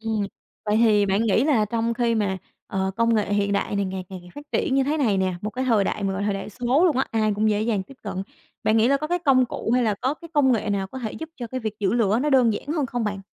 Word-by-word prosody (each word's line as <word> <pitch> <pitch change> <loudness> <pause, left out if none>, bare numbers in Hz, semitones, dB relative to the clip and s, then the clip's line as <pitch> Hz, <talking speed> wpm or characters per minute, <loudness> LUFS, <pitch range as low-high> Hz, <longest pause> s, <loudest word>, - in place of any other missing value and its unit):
Ừm, 220 -2 -1 0.4
vậy 210 0 +2
thì 215 -3 +4
bạn 195 +2 +1
nghĩ 225 +2 +2
là 265 -8 +3
trong 230 +2 -1
khi 235 -1 +1
mà, 200 -3 0 0.3
ờ, 190 0 -1
công 230 0 +3
nghệ 210 -1 0
hiện 200 0 +1
đại 200 0 -1
này 200 - +1
ngày 190 -1 -4
càng 190 - -7
ngày 175 0 -15
phát 290 - -8
triển 265 - +1
như 270 0 +3
thế 295 +3 0
này 230 -9 +2
nè, 185 -1 0
một 210 - -2
cái 255 +3 -3
thời 225 -5 +3
đại 205 - -2
mà 195 -1 0
gọi 190 +1 -3
thời 205 0 0
đại 195 - -5
số 250 - +1
luôn 325 -8 +3
á, 265 - +2
ai 215 -2 +1
cũng 215 +1 +2
dễ 210 0 +1
dàng 215 -4 0
tiếp 235 +9 -15
cận, 190 -3 -4 0.4
bạn 215 - +2
nghĩ 225 +2 +4
là 280 - +4
có 305 +2 -4
cái 350 +3 0
công 270 -6 +4
cụ 230 - -4
hay 250 - +3
là 215 -3 +1
có 265 +3 0
cái 335 +2 -13
công 275 -3 +4
nghệ 220 -2 -1
nào 195 -1 -1
có 260 +7 -8
thể 225 -4 -4
giúp 320 0 -7
cho 245 - -5
cái 255 +3 -5
việc 220 -2 -3
giữ 195 -2 +1
lửa 225 -2 +2
nó 300 - +1
đơn 250 -5 +4
giản 205 - -5
hơn 300 -3 0
không 245 -1 -3
bạn? 205 -2 -3
220 Hz, 310 wpm, -24 LUFS, 205-255 Hz, 0.4 s, thì